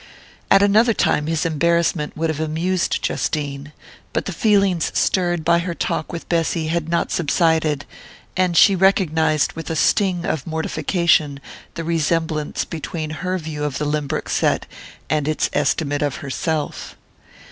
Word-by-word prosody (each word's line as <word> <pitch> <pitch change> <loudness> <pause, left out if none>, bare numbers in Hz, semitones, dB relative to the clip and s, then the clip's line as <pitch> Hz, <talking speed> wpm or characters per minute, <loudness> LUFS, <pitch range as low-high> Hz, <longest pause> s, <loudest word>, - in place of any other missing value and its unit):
At 195 - +6
another 215 +3 +4
time 150 - +1
his 165 0 0
embarrassment 165 -1 0
would 160 0 0
have 155 - -5
amused 165 +4 -1
Justine; 145 -1 -2 0.4
but - - -1
the - - -3
feelings 195 -5 +2
stirred 175 -3 +1
by 170 - +4
her 170 0 -3
talk 155 - -2
with 170 - -7
Bessy 165 -1 0
had 165 -1 -1
not 170 - 0
subsided, 160 -2 +1 0.5
and 180 -2 +1
she 200 - +7
recognized 160 -5 +2
with 165 -2 -7
a 165 - -2
sting 180 +1 +2
of 155 -1 -2
mortification 160 -2 +1 0.4
the 165 - -4
resemblance 160 -2 -1
between 160 -1 -5
her 185 +4 -2
view 155 -3 -5
of 145 -3 -2
the 150 - -2
Lynbrook 150 -1 -2
set - - +1 0.4
and 150 -2 0
its 155 - 0
estimate 145 +1 0
of 145 -2 0
herself. 150 +2 -3
160 Hz, 145 wpm, -21 LUFS, 150-175 Hz, 0.5 s, she